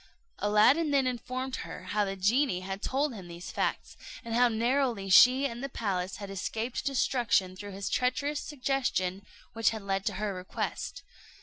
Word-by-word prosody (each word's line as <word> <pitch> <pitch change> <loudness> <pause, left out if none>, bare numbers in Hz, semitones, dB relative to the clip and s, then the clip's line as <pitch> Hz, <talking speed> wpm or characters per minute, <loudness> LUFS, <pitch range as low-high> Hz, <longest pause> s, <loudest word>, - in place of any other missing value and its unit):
Aladdin 215 +10 +4
then 280 -2 +3
informed 255 +1 -3
her - - -7
how 210 0 +1
the 195 0 -3
genie 205 +1 +2
had 195 +1 -5
told 275 +3 0
him 190 -5 -9
these 170 +1 -8
facts, - - -2 0.3
and 230 - -4
how 245 +1 +5
narrowly 235 -3 0
she 255 +8 +7
and 240 -1 -4
the 275 - -3
palace 190 -6 -2
had 200 0 -7
escaped 220 +5 -3
destruction 240 -8 +1
through 205 +1 -8
his 195 0 -5
treacherous 280 +4 0
suggestion 250 -9 -1 0.3
which 225 0 +3
had 220 -2 -5
led 195 -1 -1
to 205 - 0
her 205 +1 -2
request. 185 0 -4
225 Hz, 170 wpm, -29 LUFS, 195-255 Hz, 0.3 s, she